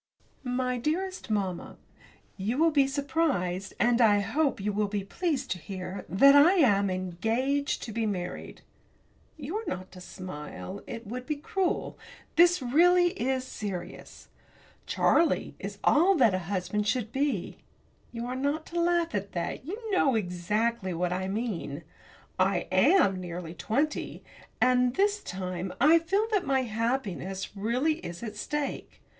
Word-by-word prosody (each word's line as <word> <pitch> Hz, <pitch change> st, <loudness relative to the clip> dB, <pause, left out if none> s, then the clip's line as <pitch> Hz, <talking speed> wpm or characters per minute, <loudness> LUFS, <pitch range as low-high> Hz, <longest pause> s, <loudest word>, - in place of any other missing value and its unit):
MY 250 Hz, 0 st, -1 dB
DEAREST 365 Hz, +7 st, -2 dB
MAMMA, 195 Hz, -5 st, -2 dB, 0.6 s
You 215 Hz, +6 st, -2 dB
will 325 Hz, +2 st, +4 dB
be 280 Hz, -3 st, +4 dB
surprised, 270 Hz, -, -1 dB
and 240 Hz, 0 st, +3 dB
I 210 Hz, -3 st, +5 dB
hope 285 Hz, +7 st, 0 dB
you 205 Hz, +1 st, -2 dB
will 210 Hz, 0 st, +1 dB
be 200 Hz, -1 st, -3 dB
pleased 280 Hz, -, -2 dB
to 180 Hz, -, -2 dB
hear 185 Hz, +1 st, -6 dB
that 275 Hz, +9 st, +6 dB
I 300 Hz, +6 st, +7 dB
am 205 Hz, -, +4 dB
engaged 225 Hz, -, -1 dB
to 230 Hz, -, -6 dB
be 225 Hz, 0 st, -1 dB
married! 180 Hz, -3 st, -5 dB, 0.7 s
You 310 Hz, +7 st, -4 dB
are 445 Hz, -, -4 dB
not 185 Hz, 0 st, -5 dB
to 180 Hz, -, -12 dB
smile 185 Hz, +1 st, -8 dB
it 230 Hz, 0 st, -7 dB
would 250 Hz, +4 st, -6 dB
be 305 Hz, -, 0 dB
cruel 360 Hz, +5 st, -2 dB, 0.4 s
this, 345 Hz, -3 st, +5 dB
really, 350 Hz, +7 st, +5 dB
is 265 Hz, -8 st, -1 dB
serious. 200 Hz, -7 st, -7 dB, 0.6 s
Charlie 330 Hz, -2 st, +2 dB
is 200 Hz, +1 st, -6 dB
all 355 Hz, +6 st, +5 dB
that 240 Hz, -, +4 dB
a 185 Hz, -, 0 dB
husband 205 Hz, +2 st, -1 dB
should 225 Hz, -2 st, 0 dB
be 265 Hz, -9 st, -1 dB, 0.5 s
you 235 Hz, 0 st, -5 dB
are 250 Hz, +1 st, -4 dB
not 285 Hz, +4 st, -1 dB
to 345 Hz, -, +1 dB
laugh 345 Hz, -2 st, +1 dB
at 200 Hz, -1 st, -3 dB
that 170 Hz, +8 st, -3 dB
you 390 Hz, +5 st, -4 dB
know 280 Hz, -10 st, +3 dB
exactly 200 Hz, +1 st, -1 dB
what 180 Hz, +1 st, 0 dB
I 190 Hz, +1 st, -2 dB
mean. 190 Hz, -, -3 dB, 0.6 s
I 185 Hz, -1 st, +2 dB
am 195 Hz, -, +4 dB
nearly 175 Hz, -2 st, -6 dB
twenty, 275 Hz, -, -2 dB, 0.4 s
and, 250 Hz, 0 st, +3 dB
this 410 Hz, +1 st, +2 dB
time, 185 Hz, -, -4 dB
I 310 Hz, +6 st, +6 dB
feel 390 Hz, +6 st, +1 dB
that 410 Hz, -4 st, +2 dB
my 270 Hz, -4 st, +1 dB
happiness 215 Hz, -5 st, -3 dB
really 250 Hz, +10 st, 0 dB
is 175 Hz, -, -8 dB
at 215 Hz, -2 st, -5 dB
stake. 290 Hz, +6 st, -4 dB
235 Hz, 150 wpm, -28 LUFS, 190-295 Hz, 0.7 s, I